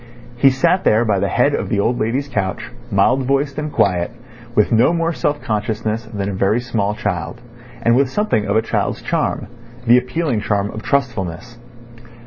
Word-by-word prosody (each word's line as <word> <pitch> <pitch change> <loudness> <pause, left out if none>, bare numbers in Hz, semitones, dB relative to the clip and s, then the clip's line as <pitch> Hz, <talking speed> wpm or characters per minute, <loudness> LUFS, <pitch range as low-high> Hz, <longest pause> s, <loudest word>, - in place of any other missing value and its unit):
He 135 +3 +5
sat 170 +8 +2
there 110 +2 +3
by 100 -3 +1
the 100 - 0
head - - +2
of - - -2
the 100 - 0
old 120 +4 +1
lady's 125 +6 -1
couch, 100 -8 -3 0.2
mild 125 +7 +3
voiced 140 +1 0
and 150 0 -4
quiet, 90 -7 +1 0.5
with 105 - +3
no 120 +8 +4
more 165 0 0
self 145 -1 -1
consciousness 110 +1 -2
than 100 -3 -4
a 100 - -3
very 100 +4 +1
small 115 -4 -1
child, - - -3 0.4
and 115 0 +4
with 135 0 +3
something 170 - 0
of 100 - 0
a 110 - +3
child's - - -2
charm—the 120 +1 0
appealing 125 -2 -2
charm 100 -1 -1
of 110 - -7
trustfulness. 120 - -2
115 Hz, 175 wpm, -19 LUFS, 105-135 Hz, 0.5 s, He